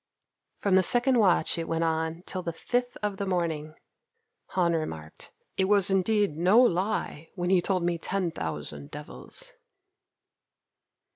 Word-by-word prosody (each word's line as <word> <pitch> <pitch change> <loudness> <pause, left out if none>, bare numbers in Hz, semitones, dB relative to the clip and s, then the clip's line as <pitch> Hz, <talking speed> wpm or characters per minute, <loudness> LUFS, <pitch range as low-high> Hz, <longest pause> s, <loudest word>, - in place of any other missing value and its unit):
From 200 - 0
the 190 - +7
second 245 +6 +3
watch 180 -5 +3
it 165 - -3
went 165 0 0
on 160 +1 -1
till 185 - -4
the 170 - -3
fifth 245 +8 -2
of 205 -2 -1
the 200 - -2
morning. 160 -4 -2 0.8
Han 175 -2 +3
remarked, 80 - -5 0.3
"It 190 - +3
was 200 -1 +4
indeed 195 -2 +2
no 185 +7 +5
lie 185 -7 +1
when 175 0 -1
he 185 -2 +5
told 185 -1 0
me 170 -1 0
'ten 185 -1 -1
thousand 75 - -5
devils.'" - - -6
180 Hz, 145 wpm, -28 LUFS, 160-200 Hz, 0.8 s, the